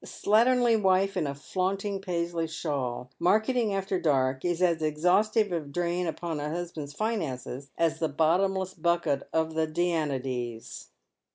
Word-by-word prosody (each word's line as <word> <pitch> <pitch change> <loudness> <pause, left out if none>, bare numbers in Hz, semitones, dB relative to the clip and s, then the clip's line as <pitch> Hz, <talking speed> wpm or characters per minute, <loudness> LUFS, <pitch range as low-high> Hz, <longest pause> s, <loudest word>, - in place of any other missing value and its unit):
A - - -11
slatternly 235 +1 +3
^\^fe 195 0 +3
in 170 -5 0
a 140 - -3
flaunting 195 +6 -2
Paisley 170 -3 -2
shawl, 135 -6 -3
marketing 220 +5 +2
after 195 -1 -1
dark, 130 -4 +1
is 175 -1 0
as 170 -3 +2
exhaustive 180 +7 +2
a 170 - 0
drain 170 +4 -2
upon 165 -1 -3
a 150 +1 -3
husband's 165 -3 -5
finances 140 - -3
as 165 -1 +1
the 160 - 0
bottomless 185 +5 +1
bucket 170 -5 0
of 160 0 0
the 160 0 +1
Danaides. 135 -8 -2
170 Hz, 145 wpm, -28 LUFS, 150-190 Hz, -, slatternly